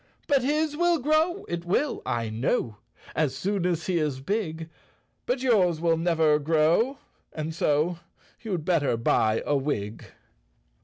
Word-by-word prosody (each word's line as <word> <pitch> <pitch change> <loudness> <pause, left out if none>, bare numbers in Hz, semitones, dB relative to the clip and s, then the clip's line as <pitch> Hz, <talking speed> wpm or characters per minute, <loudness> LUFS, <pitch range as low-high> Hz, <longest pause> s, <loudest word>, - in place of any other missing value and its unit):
" - - -37
But 280 -2 +3
his 300 +3 0
will 345 +1 +3
grow, 315 +6 +1
it 170 0 -4
will, 225 +12 0
I 115 -2 -1
know, 110 -1 -1 0.4
As 150 -4 0
soon 185 +5 -1
as 170 -2 -1
he 180 -3 +1
is 150 -4 -1
big, 165 -1 -3 0.6
But 250 +1 -1
yours 185 -10 +3
will 165 0 +2
never 160 -2 +2
grow 165 - +2 0.2
— - - -36
and 155 0 -4
so 160 +2 +1 0.4
You'd 185 -9 -3
better 150 -9 +1
buy 110 -1 +1
a 145 - +1
wig! 115 -7 -3
165 Hz, 155 wpm, -26 LUFS, 150-225 Hz, 0.6 s, But